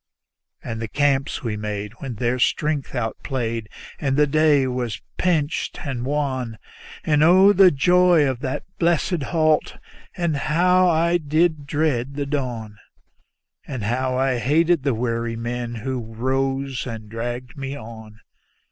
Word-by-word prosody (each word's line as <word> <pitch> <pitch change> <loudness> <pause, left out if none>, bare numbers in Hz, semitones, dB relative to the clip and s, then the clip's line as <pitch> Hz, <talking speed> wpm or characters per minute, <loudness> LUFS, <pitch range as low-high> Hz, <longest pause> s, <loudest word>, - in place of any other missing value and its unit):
And 115 -1 -5
the 115 - -3
camps 140 +3 0
we 115 -3 -2
made 105 -1 -4
when 130 -4 -5
their 120 +3 -1
strength 150 +1 0
outplayed 115 -1 -3 0.3
and 135 -2 0
the 150 - +5
day 150 -2 +3
was 125 -3 -3 0.2
pinched 160 -5 -1
and 130 -4 -3
wan; 130 -6 -2 0.5
And 150 -2 +2
oh, 190 +5 +7
the 195 -1 +7
joy 175 0 +4
of 130 -3 -2
that 130 0 -3 0.2
blessed 170 0 +1
halt, 155 -2 +1 0.4
and 170 -4 0
how 180 +5 +3
I 170 +1 +3
did 155 -1 +1
dread 140 -3 0
the 145 0 -2
dawn; 120 -7 -4 0.9
And 130 -6 -5
how 130 +4 -1
I 130 -2 +1
hated 160 +5 +2
the 135 -3 0
weary 115 0 -2
men 120 +1 -4
who 130 +3 -3
rose 135 +4 -2
and 110 -3 -7
dragged 120 +5 -5
me 135 0 -5
on. 110 -2 -11
135 Hz, 140 wpm, -22 LUFS, 120-155 Hz, 0.9 s, oh